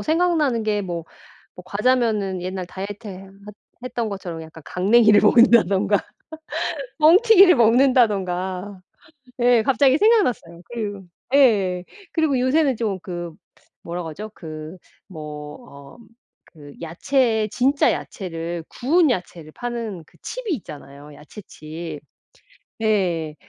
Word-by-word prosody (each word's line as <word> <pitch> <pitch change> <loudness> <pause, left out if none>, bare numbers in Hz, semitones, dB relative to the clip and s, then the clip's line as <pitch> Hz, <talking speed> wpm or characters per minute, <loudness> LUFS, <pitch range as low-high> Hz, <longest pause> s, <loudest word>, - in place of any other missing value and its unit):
생각나는 315 -7 +1
게 210 -1 0
뭐, 170 -4 -5 0.5
뭐 180 - -10
과자면은 210 -4 0
옛날 185 0 -4
다이어트 205 +4 -8
해 185 -1 -8
했 - - -16 0.5
했던 240 -3 -3
것처럼 175 -4 -6
약간 160 0 -13
강냉이를 210 +3 +4
먹는다든가 210 -3 +4 1.0
뻥튀기를 375 +3 +7
먹는다든가 205 -6 +1 0.6
예 240 -2 +4
갑자기 270 +2 +3
생각났어요. 315 - +1
그리고 205 -4 -5 0.3
예예예. 200 -10 +3 0.3
그리고 310 -5 +1
요새는 270 +1 +2
좀 205 -5 -2
그 175 -3 -6 0.5
뭐라고 170 -1 -5
하죠? 210 +7 -8
그 155 +1 -9 0.3
뭐 150 -4 -8
어 140 - -14 0.6
그 145 -1 -12
야채에 220 - 0
진짜 270 +5 +2
야채를 170 -3 -6
구운 310 +5 +2
야채를 170 -6 -5
파는 230 -7 -5
그 - - -25
칩이 - - -4
있잖아요 145 - -11
야채 180 +8 -12
칩 155 0 -8 0.8
예 175 -8 0
205 Hz, 260 characters per minute, -22 LUFS, 175-245 Hz, 1.0 s, 뻥튀기를